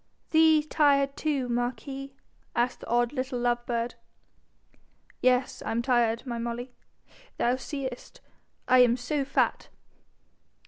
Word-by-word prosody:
'Thee 315 Hz, -1 st, +5 dB
tired 280 Hz, -3 st, +2 dB
too, 285 Hz, -5 st, -1 dB
marquis?' 270 Hz, +3 st, -3 dB, 0.4 s
asked 240 Hz, +1 st, 0 dB
the -, -, -11 dB
odd 240 Hz, +2 st, +1 dB
little 255 Hz, -2 st, -3 dB
love 240 Hz, 0 st, 0 dB
bird. 235 Hz, 0 st, -1 dB, 1.3 s
'Yes, 255 Hz, 0 st, +2 dB
I -, -, -4 dB
am 230 Hz, +1 st, 0 dB
tired, 240 Hz, -2 st, +1 dB
my 240 Hz, -2 st, -4 dB
Molly. 240 Hz, +2 st, -5 dB, 0.6 s
Thou 245 Hz, +1 st, +2 dB
seest 260 Hz, -1 st, -6 dB, 0.5 s
I 255 Hz, 0 st, +6 dB
am 245 Hz, -1 st, +5 dB
so 275 Hz, +4 st, -1 dB
fat.' 270 Hz, -, 0 dB
250 Hz, 125 wpm, -27 LUFS, 240-275 Hz, 1.3 s, I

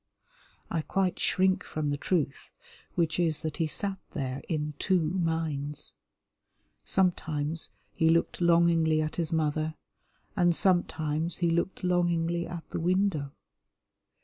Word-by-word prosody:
I 165 Hz, -, 0 dB
quite 190 Hz, +3 st, 0 dB
shrink 190 Hz, 0 st, +2 dB
from 150 Hz, -2 st, -2 dB
the 145 Hz, -, -1 dB
truth, 150 Hz, -3 st, -1 dB, 0.5 s
which 165 Hz, -1 st, +1 dB
is 160 Hz, -3 st, +1 dB
that 155 Hz, -2 st, -3 dB
he 165 Hz, -3 st, +1 dB
sat 195 Hz, +5 st, 0 dB, 0.2 s
there 135 Hz, -2 st, -3 dB
in 150 Hz, -2 st, -1 dB
two 190 Hz, -2 st, +3 dB
minds. 160 Hz, -4 st, -1 dB, 0.9 s
Sometimes 160 Hz, -4 st, 0 dB, 0.2 s
he 160 Hz, -, +3 dB
looked 165 Hz, +2 st, +2 dB
longingly 170 Hz, -2 st, +4 dB
at 155 Hz, 0 st, -2 dB
his 170 Hz, -1 st, -1 dB
mother, 155 Hz, 0 st, 0 dB, 0.6 s
and 175 Hz, -3 st, +3 dB
sometimes 165 Hz, -3 st, +1 dB
he 170 Hz, -2 st, +1 dB
looked 170 Hz, +3 st, -1 dB
longingly 175 Hz, -1 st, +1 dB
at 170 Hz, -1 st, -7 dB
the -, -, -2 dB
window. 175 Hz, -5 st, +1 dB
165 Hz, 125 wpm, -29 LUFS, 155-175 Hz, 0.9 s, longingly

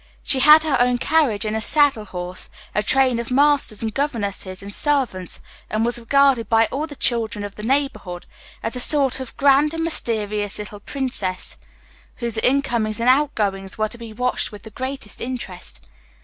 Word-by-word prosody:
She 270 Hz, -2 st, +3 dB
had 300 Hz, +4 st, +7 dB
had 285 Hz, -5 st, 0 dB
her -, -, +5 dB
own 250 Hz, 0 st, +1 dB
carriage 260 Hz, -7 st, +1 dB
and 215 Hz, 0 st, -2 dB
a 220 Hz, -, -2 dB
saddle 280 Hz, -4 st, +4 dB
horse, 180 Hz, -1 st, -5 dB, 0.2 s
a 210 Hz, -, +1 dB
train 255 Hz, +2 st, +3 dB
of 235 Hz, -, -5 dB
masters, 275 Hz, -5 st, +2 dB
and 220 Hz, -1 st, -3 dB
governesses, 200 Hz, -9 st, -3 dB
and 200 Hz, 0 st, -2 dB
servants, 260 Hz, -12 st, +1 dB, 0.3 s
and 220 Hz, +1 st, 0 dB
was 240 Hz, 0 st, +3 dB
regarded 270 Hz, 0 st, +2 dB
by 225 Hz, 0 st, +4 dB
all 295 Hz, +4 st, -3 dB
the 290 Hz, -, -10 dB
children 225 Hz, -5 st, -1 dB
of 200 Hz, -, -8 dB
the 210 Hz, -, -10 dB
neighborhood 215 Hz, -8 st, -2 dB, 0.4 s
as 225 Hz, +3 st, -2 dB
a -, -, -2 dB
sort 270 Hz, 0 st, +4 dB
of 260 Hz, -2 st, -8 dB
grand 285 Hz, +3 st, +3 dB
and 325 Hz, -, -2 dB
mysterious 210 Hz, -9 st, +1 dB
little 210 Hz, 0 st, -8 dB
princess, 205 Hz, -7 st, -2 dB, 0.6 s
whose 235 Hz, -2 st, -4 dB
incomings 235 Hz, -5 st, 0 dB
and 235 Hz, +2 st, +2 dB
outgoings 210 Hz, -9 st, 0 dB
were 215 Hz, 0 st, -1 dB
to 235 Hz, -, -8 dB
be 230 Hz, -1 st, -9 dB
watched 250 Hz, +3 st, -2 dB
with 210 Hz, -, -12 dB
the 220 Hz, -, -11 dB
greatest 260 Hz, -2 st, -6 dB
interest. 235 Hz, -8 st, -6 dB
235 Hz, 180 wpm, -21 LUFS, 210-275 Hz, 0.6 s, had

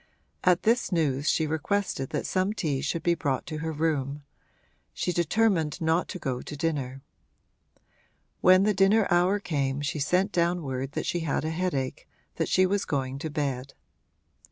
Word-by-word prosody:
At 180 Hz, -1 st, +3 dB
this 230 Hz, +1 st, +2 dB
news 145 Hz, -4 st, +1 dB
she 160 Hz, -, +2 dB
requested 160 Hz, -2 st, -1 dB
that -, -, -2 dB
some 190 Hz, +2 st, 0 dB
tea 150 Hz, -10 st, -1 dB
should 155 Hz, +3 st, -2 dB
be 175 Hz, -, +3 dB
brought 140 Hz, -6 st, -1 dB
to 155 Hz, -3 st, -5 dB
her 160 Hz, +1 st, -3 dB
room 145 Hz, -2 st, -1 dB, 0.7 s
she 180 Hz, -, -1 dB
determined 170 Hz, -2 st, +1 dB
not 165 Hz, +2 st, +1 dB
to -, -, -5 dB
go 130 Hz, -7 st, -3 dB
to 150 Hz, -, -8 dB
dinner. 135 Hz, -4 st, -2 dB, 1.4 s
When 185 Hz, +1 st, +6 dB
the 210 Hz, +1 st, +3 dB
dinner 195 Hz, +2 st, +4 dB
hour 180 Hz, +3 st, +4 dB
came 140 Hz, -7 st, -1 dB
she 150 Hz, +1 st, -2 dB
sent 180 Hz, +8 st, +1 dB
down 170 Hz, 0 st, +1 dB
word 135 Hz, 0 st, -4 dB
that -, -, -2 dB
she 175 Hz, -, -1 dB
had 155 Hz, -2 st, -1 dB
a 160 Hz, -, -1 dB
headache, 160 Hz, -7 st, -2 dB, 0.3 s
that -, -, -1 dB
she 185 Hz, -, +4 dB
was 195 Hz, +1 st, +1 dB
going 135 Hz, -1 st, -2 dB
to 160 Hz, -, -4 dB
bed. 140 Hz, -3 st, -3 dB
160 Hz, 170 wpm, -27 LUFS, 140-180 Hz, 1.4 s, When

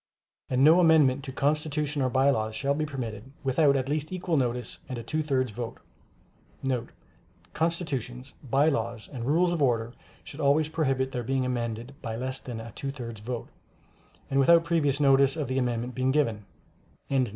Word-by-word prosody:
And 130 Hz, +1 st, +2 dB
no 160 Hz, +4 st, +7 dB
amendment 150 Hz, -6 st, +5 dB
to 135 Hz, -, -5 dB
Constitutions 150 Hz, +1 st, 0 dB
or 130 Hz, -, +2 dB
By 135 Hz, +2 st, +4 dB
Laws 110 Hz, -3 st, -1 dB
shall 140 Hz, +6 st, 0 dB
be 155 Hz, +1 st, -2 dB
permitted, 125 Hz, -4 st, -6 dB
without 140 Hz, +2 st, +3 dB
at 130 Hz, -1 st, 0 dB
least 150 Hz, +2 st, -2 dB
equal 180 Hz, -2 st, -1 dB
notice 125 Hz, -3 st, -1 dB
and 130 Hz, -, -4 dB
a 115 Hz, -, -5 dB
two 155 Hz, +7 st, -1 dB
thirds 130 Hz, -5 st, 0 dB
vote.* 115 Hz, +2 st, -6 dB, 1.8 s
[Constitutions, 145 Hz, -6 st, -2 dB, 0.2 s
By 140 Hz, +5 st, +4 dB
Laws 115 Hz, -6 st, -1 dB
and 120 Hz, -2 st, -4 dB
Rules 170 Hz, +5 st, +3 dB
of 170 Hz, -3 st, -1 dB
Order 120 Hz, -3 st, +1 dB, 0.3 s
should 145 Hz, -, -11 dB
always 150 Hz, +1 st, +3 dB
prohibit 135 Hz, -4 st, 0 dB
their 125 Hz, -2 st, -2 dB
being 130 Hz, +2 st, 0 dB
amended 120 Hz, 0 st, -3 dB
by 115 Hz, -2 st, -4 dB
less 130 Hz, +3 st, -4 dB
than 120 Hz, -3 st, -7 dB
a 115 Hz, 0 st, -8 dB
two 140 Hz, -, -5 dB
thirds 115 Hz, -6 st, -7 dB
vote, 120 Hz, +1 st, -5 dB, 0.8 s
and 135 Hz, -, +3 dB
without 165 Hz, +5 st, +6 dB
previous 150 Hz, -5 st, +1 dB
notice 135 Hz, -1 st, +4 dB
of 150 Hz, -3 st, -2 dB
the 130 Hz, +1 st, 0 dB
amendment 120 Hz, 0 st, -1 dB
being 130 Hz, +1 st, 0 dB
given. 115 Hz, -8 st, +1 dB
135 Hz, 175 wpm, -27 LUFS, 120-150 Hz, 1.8 s, no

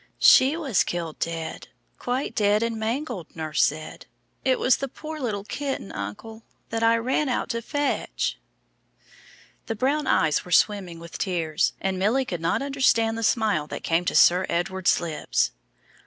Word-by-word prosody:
"She 275 Hz, +5 st, +6 dB
was 275 Hz, -, +1 dB
killed 170 Hz, -3 st, -4 dB
dead 165 Hz, -1 st, -4 dB, 0.3 s
quite 250 Hz, +3 st, -2 dB
dead 210 Hz, +1 st, +2 dB
and 230 Hz, 0 st, -1 dB
mangled, 225 Hz, -, -4 dB
nurse 155 Hz, -1 st, -1 dB
said. 155 Hz, +1 st, -3 dB, 0.4 s
It 260 Hz, -1 st, +2 dB
was 255 Hz, -, +3 dB
the 275 Hz, -, -3 dB
poor 310 Hz, +4 st, -8 dB
little 215 Hz, -7 st, -2 dB
kitten, 270 Hz, 0 st, -4 dB
uncle, 105 Hz, -, -7 dB, 0.3 s
that 225 Hz, 0 st, -1 dB
I 230 Hz, 0 st, +4 dB
ran 260 Hz, +5 st, 0 dB
out 250 Hz, -, -1 dB
to 230 Hz, -1 st, -2 dB
fetch." 290 Hz, +4 st, -2 dB, 1.3 s
The 225 Hz, -, -2 dB
brown 280 Hz, +7 st, 0 dB
eyes 155 Hz, -2 st, +2 dB
were 180 Hz, -, -12 dB
swimming 185 Hz, -2 st, +2 dB
with 170 Hz, 0 st, -9 dB
tears, 165 Hz, -3 st, 0 dB
and 190 Hz, -1 st, -2 dB
Milly 235 Hz, +8 st, +2 dB
could 175 Hz, -7 st, -4 dB
not 165 Hz, +10 st, 0 dB
understand 260 Hz, -5 st, +2 dB
the 230 Hz, -, -4 dB
smile 215 Hz, -, +1 dB
that -, -, -7 dB
came 165 Hz, +1 st, +1 dB
to -, -, -1 dB
Sir 180 Hz, +2 st, +5 dB
Edward's 180 Hz, +2 st, +1 dB
lips. 165 Hz, -3 st, -1 dB
215 Hz, 160 wpm, -25 LUFS, 170-255 Hz, 1.3 s, She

